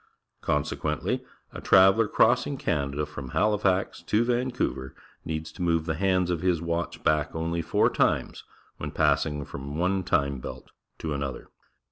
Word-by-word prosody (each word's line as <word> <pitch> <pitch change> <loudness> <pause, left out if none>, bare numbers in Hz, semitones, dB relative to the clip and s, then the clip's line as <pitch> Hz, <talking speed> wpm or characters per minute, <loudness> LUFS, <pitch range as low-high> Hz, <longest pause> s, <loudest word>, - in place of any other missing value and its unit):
Consequently, 75 -1 -1 0.3
a - - -7
traveller 95 +4 +6
crossing 125 +6 +3
T'anada 75 - -1
from 70 -3 -8
Halifax 105 -3 +1
to 110 +2 +1
Vancouver 120 - -1 0.3
needs 80 0 -4
to 90 - -10
move 85 -2 +1
the 80 - -1
hands 90 +1 +1
of 85 -2 -1
his 90 -3 +2
watch 85 +1 -3
back 75 0 +1
only 85 +1 -1
four - - +2
times - - 0 0.3
when - - -5
passing 75 -2 +1
from 70 +1 -7
one 95 +2 +1
time 70 -4 +1
belt - - -9 0.3
to 80 -2 -3
another. 70 -2 -4
85 Hz, 145 wpm, -27 LUFS, 75-95 Hz, 0.3 s, traveller